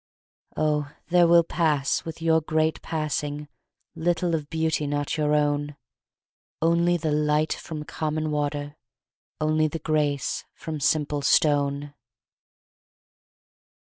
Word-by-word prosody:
Oh, 150 -1 0 0.2
there 175 -1 +5
will 170 0 +6
pass 155 -5 0
with 165 0 -7
your 160 -1 +4
great 155 +1 0
passing 150 -2 -3 0.5
Little 170 +1 0
of 150 -2 -2
beauty 160 -2 0
not 145 0 -1
your 150 -1 +1
own, 145 0 0 0.8
Only 170 +2 +3
the 160 -2 -2
light 150 +1 +2
from 155 -2 -7
common 155 0 -2
water, 145 0 -2 0.6
Only 155 0 +2
the 155 - -4
grace 150 -3 -1
from 155 -2 -5
simple 145 0 +1
stone! 145 0 +2
155 Hz, 110 wpm, -25 LUFS, 145-160 Hz, 0.8 s, will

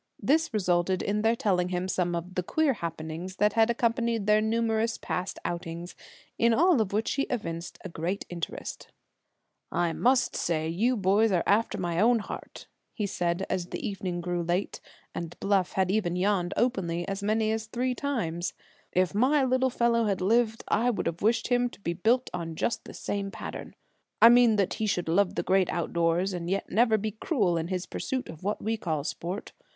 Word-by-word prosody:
This 315 +3 +2
resulted 185 -3 +1
in 210 +1 0
their 225 +2 +3
telling 180 -5 +1
him 180 0 -2
some 175 -2 0
of 170 +2 -5
the 185 - 0
queer 295 - +1
happenings 165 -1 -5
that 210 +2 +2
had 225 0 +4
accompanied 235 -2 0
their 210 +1 +4
numerous 225 0 0
past 185 +1 -3
outings; 170 0 -5 0.4
in 230 0 +4
all 340 -4 +4
of 205 - -1
which 215 +3 0
he 275 - 0
evinced 170 -9 -4 0.2
great 175 +5 -3
interest. 170 -2 -6 0.8
"I 175 -1 0
must 255 +6 +2
say 160 -2 0
you 220 +10 +1
are - - -4
boys 205 +3 +3
after 200 +5 +2
my 175 -2 -1
own 235 +4 +5
heart," 215 - -7 0.3
he 210 - -1
said, 175 -1 -1
as 180 -2 -2
the - - -4
evening 185 -3 -3
grew 175 0 -2
late, 175 +3 -2 0.3
and 170 0 -6
Bluff 195 -2 +1
had 190 -1 +1
even 195 -4 0
yawned 185 -1 0
openly 175 -8 0
as 195 0 -3
many 215 +1 +1
as 220 0 -2
three 250 +3 -1
times. 210 - -2 0.4
"If 185 +1 +2
my 265 +7 +3
little 260 0 +2
fellow 235 -2 +2
had 200 -3 0
lived 225 +4 +2
I 235 +4 +2
would 240 - -1
have 170 0 -3
wished 225 +3 +2
him 245 0 +2
to - - -16
be 170 -4 -2
built 230 +8 +2
on 165 -2 -4
just 235 - -1
the - - -10
same 200 -1 -3
pattern. 175 - -7 0.4
I 230 - +9
meant 240 -2 +6
that 195 -2 +1
he 220 - -2
should 180 -4 -1
love 180 +4 +2
the - - -1
Great 190 -1 +2
Outdoors, 170 +2 0
and 175 -1 -4
yet 195 +1 -2
never 220 +2 +4
be 215 +1 -2
cruel 210 - 0
in 165 0 -1
his 185 0 -2
pursuit 260 -1 -4
of 160 -1 -9
what 205 +2 -2
we 225 +1 0
call 160 -7 -2
sport. 175 +6 -5
200 Hz, 190 wpm, -28 LUFS, 175-230 Hz, 0.8 s, I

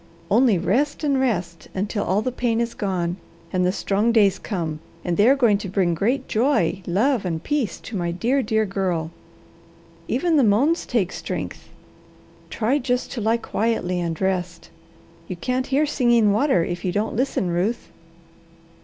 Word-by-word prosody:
Only 230 -1 +4
rest 280 - 0
and 280 -3 +2
rest, 180 -10 -2
until 205 +2 -1
all 200 +4 0
the 255 - -1
pain 235 -2 0
is 235 0 -1
gone, 180 -3 -2 0.4
and 185 -1 +2
the 180 - +2
strong 205 +4 0
days 205 -4 +3
come, 165 -7 -3 0.3
and 175 - 0
they 210 +6 +5
are 275 - +6
going 230 -7 +3
to 200 - -6
bring 185 -2 +1
great 230 - 0
joy, 215 - +1
love, 225 +7 +1
and 165 -3 -3
peace, 290 -8 -1
to 225 - -8
my 175 -3 -1
dear, 235 +11 +1
dear 220 -1 +1
girl. 185 -5 -2 1.0
Even 340 -3 +1
the 280 - +5
moans 255 +11 +2
take 205 -7 0
strength. - - -6 0.8
Try 245 +6 0
just 250 -1 -1
to 240 - -4
lie 225 +2 +2
quietly 220 -6 -1
and 170 -2 -3
rest. 185 -2 -2 0.6
You 185 - -4
can't 255 +8 -2
hear 275 +3 +2
Singing 240 -7 +3
Water 225 - +2
if 175 0 -5
you 185 - 0
don't 210 +4 -1
listen, 235 -7 0
Ruth." 195 +8 -1
210 Hz, 170 wpm, -23 LUFS, 180-250 Hz, 1.0 s, are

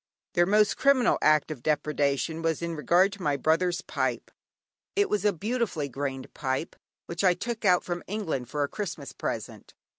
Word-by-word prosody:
Their 175 0 +3
most 210 +1 +3
criminal 275 -3 +4
act 155 0 +3
of 140 -6 -6
depredation, 150 +1 0
was 165 0 -1
in 170 -1 -2
regard 175 +5 +3
to 200 - -10
my 145 -4 +1
brother's 175 +5 +1
pipe. - - -2 0.6
It 405 0 +2
was 210 0 0
a 210 - +5
beautifully 205 - -2
grained 135 0 -4
pipe 135 +2 -2 0.3
which 170 +2 -4
I 180 -2 +5
took 230 +1 -4
out 180 -2 +4
from 175 -1 -3
England 170 - -3
for 145 -1 -1
a - - 0
Christmas 170 -6 -5
present. - - -5
170 Hz, 175 wpm, -27 LUFS, 145-200 Hz, 0.6 s, a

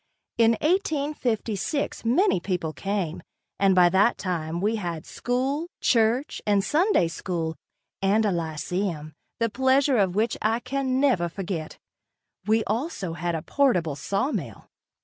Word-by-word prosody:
In 230 0 +6
1856 285 - -1
many 285 - +3
people 175 -4 -2
came, 195 -4 -3 0.4
and 195 -1 +4
by 180 -1 +7
that 195 +6 +3
time 170 -3 -3
we 215 +4 0
had 170 -5 -4
school, 270 +6 -2
church 235 +4 +1
and 200 -1 +3
Sunday 320 - +2
school 165 0 -3 0.5
and 205 +3 +3
a 205 - +2
lyceum, 165 -1 -3 0.3
the 230 - +2
pleasures 260 +2 +3
of 190 -2 0
which 225 +2 +1
I 225 +2 +1
can 260 +1 -1
never 245 -12 +2
forget. 170 -3 -5 0.7
We 220 +1 +3
also 220 - -3
had 170 0 -2
a 160 - -4
portable 180 - +1
sawmill. 220 - -3
210 Hz, 130 wpm, -25 LUFS, 175-255 Hz, 0.7 s, by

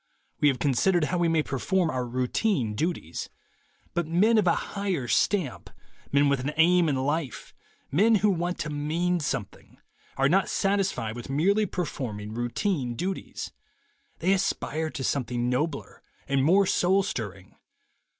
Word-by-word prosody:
.We 150 - +4
have 135 -3 +3
considered 150 +8 +2
how 175 +4 0
we 170 - +3
may 165 -2 +2
perform 170 +7 0
our 125 -1 -2
routine 125 - 0
duties. 130 - -3 0.6
But 170 -2 -1
men 210 +7 +4
of 195 - +1
a 170 - +4 0.2
higher 190 -10 -2
stamp, 175 - 0 0.4
men 140 +1 +4
with 140 -1 +2
an 140 +4 -3
aim 170 0 +5
in 140 - +1
life, 140 0 -2 0.4
men 215 +10 +4
who 210 0 +3
want 175 0 -1
to 155 - -3
mean 165 +5 0
something, 150 - -5 0.4
are 135 - +3
not 190 +6 +2
satisfied 195 - 0
with 120 +1 -8
merely 200 +10 +2
perform 140 - -4
ing 105 +1 -7
routine 120 - -1
duties. 185 +8 -4 0.7
They 185 +3 +2
aspire 160 -4 -1
to 135 - -5
something 125 -2 -1
nobler 140 +3 -2 0.3
and 135 -1 +1
more 190 +7 +5
soul 190 +2 +3
stirring. 100 - -6
155 Hz, 150 wpm, -27 LUFS, 130-185 Hz, 0.7 s, aim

